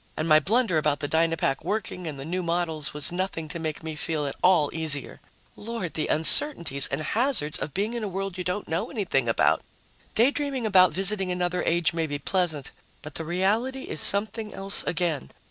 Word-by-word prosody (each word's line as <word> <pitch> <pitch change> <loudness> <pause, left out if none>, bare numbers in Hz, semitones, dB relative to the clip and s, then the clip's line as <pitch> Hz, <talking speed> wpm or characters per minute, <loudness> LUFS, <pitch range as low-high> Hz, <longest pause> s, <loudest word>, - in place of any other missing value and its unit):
And 155 - -1
my 155 -1 +7
blunder 200 - +2
about 150 -1 0
the 145 - -2
Dynapack 160 -3 +1
working 185 -2 -3
and 150 -3 -5
the 135 - -6
new 180 +3 -2
models 165 -3 -1
was 150 +1 0
nothing 175 -3 -3
to 170 - -5
make 155 -1 -4
me 160 -1 -5
feel 155 -1 -2
at 140 - -4
all 175 -6 +4
easier. 155 -4 +1 0.3
Lord, 215 -7 -5
the 155 - -2
uncertainties 160 - +1
and 135 +3 -2
hazards 220 - +1
of 145 - -5
being 210 +4 -1
in 235 -2 -3
a - - -1
world 195 0 -4
you 185 - -4
don't 180 +3 -3
know 170 +8 -2
anything 175 - 0
about! 115 - +3 0.5
Daydreaming 270 +1 +1
about 185 -4 +6
visiting 195 0 +1
another 180 0 -1
age 170 0 +1
may 165 -1 -1
be 145 -1 -3
pleasant, 155 -2 -1 0.3
but 150 - -8
the 165 - -3
reality 215 +10 0
is 155 - -3
something 210 +1 +2
else 195 +1 0
again. 165 -5 -1
175 Hz, 195 wpm, -26 LUFS, 155-200 Hz, 0.5 s, my